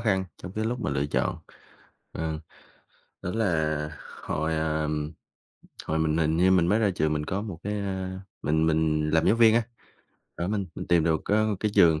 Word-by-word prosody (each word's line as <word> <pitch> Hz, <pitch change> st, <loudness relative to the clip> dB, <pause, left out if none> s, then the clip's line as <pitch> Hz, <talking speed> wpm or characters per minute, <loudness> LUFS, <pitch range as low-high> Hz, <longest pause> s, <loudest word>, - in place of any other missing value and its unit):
khăn 95 Hz, -5 st, +1 dB, 0.2 s
trong 90 Hz, -, -7 dB
cái 110 Hz, +2 st, -2 dB
lúc 120 Hz, +2 st, -2 dB
mà -, -, -1 dB
lựa 70 Hz, +1 st, 0 dB
chọn. 75 Hz, -, -1 dB, 0.7 s
Ờ, 80 Hz, -1 st, -3 dB, 0.8 s
đó -, -, -3 dB
là 80 Hz, -8 st, 0 dB, 0.3 s
hồi, 80 Hz, +1 st, -1 dB
à, 80 Hz, -1 st, 0 dB, 1.0 s
hồi 80 Hz, 0 st, 0 dB
mình 80 Hz, 0 st, +1 dB
hình 80 Hz, 0 st, +2 dB
như 90 Hz, +2 st, +5 dB
mình 90 Hz, -3 st, +4 dB
mới 105 Hz, +5 st, +3 dB
ra 110 Hz, -3 st, +3 dB
trường, 75 Hz, 0 st, +1 dB
mình 75 Hz, 0 st, -2 dB
có 95 Hz, +5 st, -2 dB
một 100 Hz, -6 st, -6 dB
cái, 105 Hz, +1 st, -2 dB
à, 95 Hz, -1 st, -3 dB, 0.2 s
mình 80 Hz, +2 st, +2 dB
mình 75 Hz, -1 st, +1 dB
làm 80 Hz, 0 st, +3 dB
giáo 100 Hz, -, +5 dB
viên 115 Hz, -1 st, +6 dB
á, 120 Hz, -, +3 dB, 0.7 s
đó, 85 Hz, -, -2 dB
mình 100 Hz, -2 st, -1 dB
mình -, -, -6 dB
tìm 85 Hz, -2 st, +4 dB
được 80 Hz, -2 st, +2 dB
có 110 Hz, +1 st, +3 dB
một 105 Hz, -2 st, 0 dB
cái 105 Hz, -, +1 dB
trường 80 Hz, -2 st, +6 dB
85 Hz, 200 wpm, -27 LUFS, 80-100 Hz, 1.0 s, viên